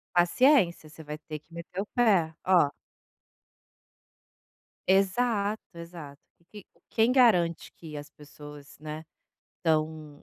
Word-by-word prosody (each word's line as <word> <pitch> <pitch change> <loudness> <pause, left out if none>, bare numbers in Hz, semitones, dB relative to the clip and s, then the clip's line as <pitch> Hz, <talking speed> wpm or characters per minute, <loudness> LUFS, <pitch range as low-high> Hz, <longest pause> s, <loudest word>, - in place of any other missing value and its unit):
Paciência. 175 - +3
Você 160 +1 -12
vai 150 0 -6
ter 155 0 -8
que 160 +3 -25
meter 170 +3 -6
o - - -4
pé. 195 -10 +3
Ó 180 -6 +4 2.2
Exato. 200 +2 +1
Exato. 170 -4 -10 0.3
E, 210 -2 -10
q - - -51 0.2
quem 225 +2 +2
garante 185 -11 +3
que 155 -3 -10
as 145 0 -9
pessoas, 150 -1 -13
né, 155 +1 -7 0.5
estão 155 -2 -2
170 Hz, 115 wpm, -28 LUFS, 155-200 Hz, 2.2 s, Ó